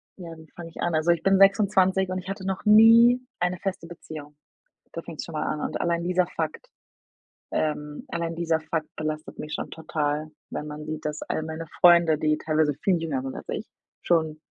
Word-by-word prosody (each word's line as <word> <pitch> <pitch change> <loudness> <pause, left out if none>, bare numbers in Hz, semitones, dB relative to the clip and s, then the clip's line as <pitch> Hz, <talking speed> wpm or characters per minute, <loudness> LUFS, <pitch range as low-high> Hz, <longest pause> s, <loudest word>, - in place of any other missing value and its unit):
ja, 170 -3 -9
wie 160 0 -15
fange 170 -1 -8
ich 165 - -14
an? 175 - 0
Also 155 +2 +3
ich 170 -1 0
bin 195 0 +4
26 195 -1 +4
und 185 0 -2
ich 185 +1 -9
hatte 195 -1 -5
noch 190 -1 -3
nie 230 +3 +7 0.2
eine 180 +1 0
feste 185 -2 -4
Beziehung. 155 -3 -10 0.6
Da 170 - -5
fängt's 165 -3 -7
schon 165 - -10
mal 155 -1 -2
an 150 - -2
und - - -3
allein 170 0 0
dieser 180 0 +2
Fakt, 160 -2 -5 0.8
ähm 150 -1 -2
allein 170 -1 -3
dieser 165 -1 0
Fakt 155 0 -3
belastet 155 0 -5
mich 150 - -6
schon - - -4
total, 155 -1 -2 0.2
wenn 150 - -5
man 150 +1 -7
sieht, 155 0 -5
dass 150 0 -4
all - - -2
meine 160 +1 -6
Freunde, 170 -2 +6
die 155 0 +1
teilweise 155 -1 +1
viel 180 +6 +1
jünger 145 -6 -2
sind 135 0 -5
als - - -9
ich, - - -4 0.4
schon 160 -3 +1
165 Hz, 200 wpm, -25 LUFS, 155-180 Hz, 0.8 s, nie